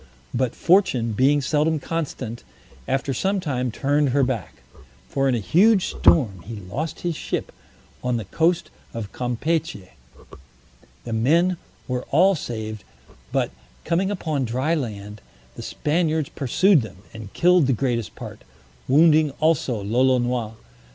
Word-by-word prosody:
But 125 -1 0
Fortune, 150 - +3
being 135 +7 +3
seldom 155 +4 +1
constant, 140 -7 -4 0.4
after 135 +1 -1
some 195 +9 0
time 130 -7 -2
turned 145 +4 +1
her 140 +2 +2
back; 110 - -3 0.4
for 135 - 0
in 125 - +2
a - - 0
huge 190 - +3
storm 110 - +3
he 115 +2 -7
lost 110 - -5
his 175 -2 -2
ship - - -4 0.5
on 125 -1 0
the 110 - -5
coast 165 - 0 0.2
of 105 -4 -5
Campechy. 125 - -2 1.1
The 115 - -5
men 165 +11 +2 0.3
were 125 0 -3
all 185 +7 +5
saved, 110 - -5 0.5
but - - 0 0.3
coming 180 +3 +1
upon 160 -8 -2
dry 130 +7 0
land, 105 -8 -4 0.3
the - - -7
Spaniards 155 -1 -1
pursued 165 - +3
them, 95 -4 -10
and 110 -3 -9
killed 175 -4 +4
the - - +3
greatest 120 -2 -2
part, - - -9 0.4
wounding 155 +2 +5
also 140 -9 +1
Lolonois. 120 0 +1
135 Hz, 135 wpm, -23 LUFS, 115-160 Hz, 1.1 s, all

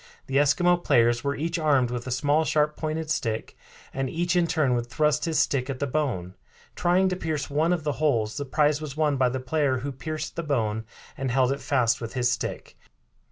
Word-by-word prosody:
The 135 - -1
Eskimo 175 +5 +3
players 120 0 +3
were 140 0 -1
each 165 +3 -2
armed 140 -6 +2
with 120 0 -4
a - - -3
small 145 +5 +2
sharp 150 -1 +1
pointed 155 0 -3
stick, 110 -7 -2 0.4
and 135 -1 -2
each 175 +3 -1
in 175 -1 +3
turn 155 -6 +1
would 120 -1 -1
thrust 150 +3 +1
his 165 -2 -1
stick 135 -1 +1
at 135 - -3
the 140 - -1
bone, 125 -11 -2 0.4
trying 180 +2 +3
to 185 - -1
pierce 155 -5 -3
one 155 +4 +2
of 175 -3 0
the 150 - 0
holes. 110 -8 +1
The 145 - -3
prize 150 +2 +1
was 150 -2 -6
won 150 -3 +2
by 130 -1 +3
the 130 +2 -3
player 135 0 0
who 140 - -2
pierced 155 +3 -5
the - - -2
bone 110 -8 -1 0.3
and 135 -1 -3
held 130 +1 +2
it 140 - -3
fast 120 -4 +1
with 115 - -5
his 120 -1 +2
stick. - - -4
145 Hz, 215 wpm, -26 LUFS, 125-155 Hz, 0.4 s, Eskimo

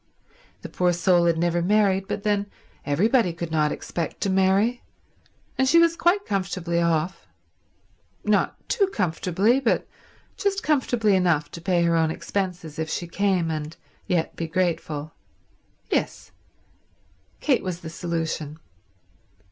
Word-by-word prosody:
The - - -5
poor 180 -1 +1
soul 175 0 +3
had 165 -1 +2
never 175 +1 +1
married, 195 0 +2
but 200 - -4
then 205 -1 +1 0.4
everybody 200 - +3
could 170 -1 -6
not 150 -2 +2
expect 170 -2 -4
to 195 - +1
marry, 195 +6 +2 0.8
and 265 0 +3
she 335 - +5
was 335 0 +5
quite 360 +4 +2
comfortably 185 -3 -1
off—not 170 +2 -3
too 405 -5 +2
comfortably, 195 - +1
but 255 -4 0 0.5
just 400 -1 -1
comfortably 245 -8 +2
enough 175 -5 +1
to 170 - -8
pay 175 0 +1
her 170 0 +2
own 160 -1 +2
expenses 175 -3 -4
if 160 0 -2
she 175 - -3
came 185 -2 0
and 155 +1 -5 0.3
yet 175 -4 0
be 165 - -3
grateful. 160 -3 -2 0.8
Yes; - - -2 1.1
Kate 265 -6 +2
was 180 -2 -4
the 160 - -7
solution. 165 -3 -3
180 Hz, 130 wpm, -24 LUFS, 165-205 Hz, 1.1 s, she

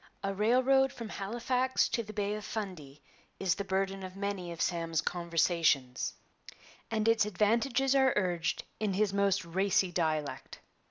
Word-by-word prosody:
'A 195 0 -1
railroad 255 +6 +3
from 230 -2 -7
Halifax 245 +6 0
to 235 - 0
the 215 -1 -8
Bay 205 -1 -1
of 210 0 -5
Fundy' 175 -11 -6 0.4
is 190 -3 +2
the 200 - -4
burden 195 0 -1
of 185 0 -8
many 195 -3 -3
of 170 - -8
Sam's 165 -2 0
conversations, 165 -6 +1 0.7
and 220 -1 0
its 225 -1 +4
advantages 235 +6 +1
are 265 -1 +4
urged 175 -4 0 0.2
in 210 -2 0
his 200 0 +1
most 200 -2 +1
racy 190 +1 +1
dialect. 155 -5 -2
195 Hz, 150 wpm, -31 LUFS, 175-220 Hz, 0.7 s, its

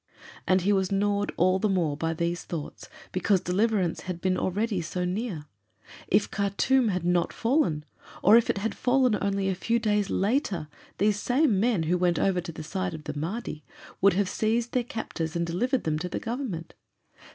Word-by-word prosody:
And 185 0 +4
he 200 +3 +2
was 190 -1 +1
gnawed 205 +1 +1
all 185 +2 +3
the 215 - +1
more 170 -6 +1
by 165 +2 -2
these 170 +1 -2
thoughts 160 -4 -7 0.2
because 185 +1 +2
deliverance 190 0 0
had 180 -2 -5
been 185 +1 +1
already 200 +2 -1
so 180 +2 -3
near. 185 -4 -3 0.6
If 200 +2 +2
Khartûm 215 +5 +2
had 180 -3 -2
not 175 -1 +2
fallen, 230 - +1 0.4
or 205 +4 +7
if 235 - +4
it - - +1
had 220 +3 -2
fallen 255 -2 +2
only 195 -1 0
a 190 - +1
few 230 +5 0
days 210 -3 +1
later, 200 - 0 0.3
these 205 +1 +2
same 245 -3 +2
men, 220 -5 +2
who 175 +3 +1
went 175 -1 +2
over 185 -2 +1
to 175 -1 -7
the 155 - -8
side 185 +1 -3
of 155 - -9
the 150 - -5
Mahdi, 160 0 -4 0.4
would 200 0 +6
have 200 +1 +1
seized 225 +4 0
their 250 - +1
captors 170 -9 -4
and 170 0 0
delivered 245 +10 0
them 155 -1 -1
to 180 +2 -4
the - - -3
Government. 225 -9 -4
190 Hz, 190 wpm, -27 LUFS, 175-220 Hz, 0.6 s, or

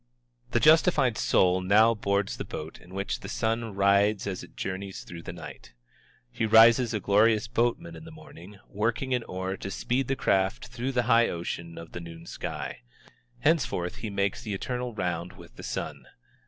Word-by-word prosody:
The - - +1
justified 155 - +5
soul 95 -2 +3
now 105 +5 +5
boards 100 -2 -1
the - - -4
boat 80 +1 -7
in 90 +2 -13
which 100 +1 -2
the - - -8
sun 115 -1 -2
rides 100 +1 +3
as 95 -2 -4
it - - -15
journeys 95 +1 -5
through 85 -1 -9
the - - -7
night. 75 -7 -11 0.6
He 115 - -1
rises 115 +2 +6
a 105 - -1
glorious 105 +3 +3
boatman 120 +9 -1
in - - -11
the 165 - -10
morning, 105 - -13
working 115 +5 -1
an 125 - +1
oar 95 +1 -4
to 95 - -6
speed 125 +6 -1
the 135 - 0
craft 95 +2 0
through 125 +2 -3
the 125 -1 +2
high 115 0 +4
ocean 85 0 -5
of 85 0 -9
the - - -6
noon 85 -1 -10
sky. - - -6 0.6
Henceforth 145 - +1
he 110 - -5
makes 100 +1 -1
the 105 -4 -4
eternal 125 +3 -4
round 90 -2 -3
with 85 -2 -15
the - - -10
sun. - - -5
105 Hz, 180 wpm, -27 LUFS, 95-120 Hz, 0.6 s, rises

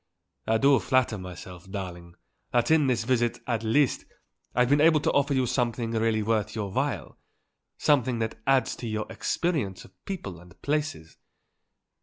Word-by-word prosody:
I 110 - +3
do 135 +3 +5
flatter 130 -5 +1
myself, 90 0 -10
darling, 90 -3 -7 0.4
that 120 +4 +2
in 155 -3 +5
this 120 -3 +1
visit, 120 -1 +1
at 115 -3 -1
least, 120 +5 +2 0.5
I've 125 0 +4
been 145 +1 +4
able 160 -1 +6
to - - +1
offer 140 0 +2
you 130 -1 +2
something 120 -2 -1
really 110 -1 +1
worth 110 -1 0
your 105 -3 -3
while, - - -2 0.6
something 130 -5 +2
that 110 -1 -3
adds 135 -3 +3
to 120 - -6
your 110 -1 -2
experience 145 - -2
of 95 - -18
people 100 - -5
and 90 +1 -17
places. 145 - -2
115 Hz, 160 wpm, -27 LUFS, 105-135 Hz, 0.6 s, able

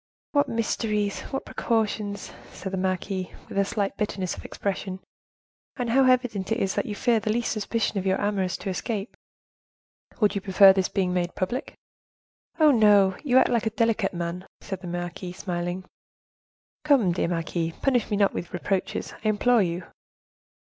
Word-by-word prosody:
"What 285 -1 +2
mysteries! 210 -2 -1
what 270 - -4
precautions!" 210 -3 -1 0.2
said 190 0 -7
the - - 0
marquise, 185 0 -1 0.2
with - - -9
a - - +5
slight 200 0 -2
bitterness 195 -4 -2
of - - -10
expression; 190 -1 -4 0.8
"and 245 -3 -2
how 265 +2 +5
evident 235 -6 0
it 225 - +2
is 195 -5 0
that - - -1
you 210 - -3
fear 235 +1 +2
the 215 0 -1
least 235 +1 0
suspicion 215 -1 -1
of 190 - -5
your 190 - +2
amours 195 -3 -1
to 195 - -5
escape." 205 +2 -4 1.0
"Would 210 -3 +3
you 200 - -2
prefer 195 0 +7
their 190 -1 +1
being 185 -3 0
made 175 -1 -1
public?" 240 +10 -3 0.8
"Oh, 310 -2 +7
no; 205 -5 +5
you 260 -3 +3
act - - +5
like 230 -2 +1
a - - +3
delicate 225 -4 0
man," 170 +1 -4
said 190 -2 -6
the 180 - -7
marquise, 175 +1 -5
smiling. 175 0 -3 1.0
"Come, 275 -11 +4
dear 170 - 0
marquise, 165 -1 -2
punish 250 -4 +2
me 205 - 0
not 200 -1 +3
with 175 - -5
reproaches, 195 -2 -2
I - - 0
implore 230 +3 +3
you." 175 -1 -1
200 Hz, 170 wpm, -26 LUFS, 185-225 Hz, 1.0 s, prefer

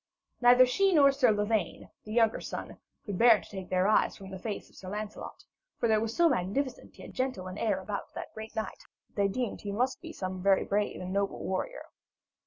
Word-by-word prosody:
Neither 245 +1 +7
she 385 +9 +2
nor 280 -2 +7
Sir 270 -3 +3
Lavaine, 210 -1 -1
the 215 - -8
younger 225 0 +3
son, - - -6 0.3
could 200 -5 -4
bear 230 -3 +7
to - - -14
take 190 -2 -8
their 185 +1 +2
eyes 215 - +3
from 195 -1 -10
the 190 - -7
face 210 +1 -5
of - - -23
Sir 185 - -9
Lancelot; 210 +1 -6 0.3
for 235 - +1
there 215 -1 +3
was 225 0 -3
so 345 - +5
magnificent 260 - -2
yet - - -10
gentle 255 -7 -2
an 185 +2 -7
air 210 -4 +1
about 200 +1 -5
the - - -4
great 220 0 -9
knight, 220 - -4 0.3
that - - -37
they 200 -1 +2
deemed 240 +3 -3
he 205 - -4
must 250 +6 -1
be 330 -2 -8
some 185 - -5
very 195 0 +3
brave 205 +1 -1
and 185 +1 -5
noble 200 0 -1
warrior. - - -3
215 Hz, 215 wpm, -30 LUFS, 195-245 Hz, 0.3 s, Neither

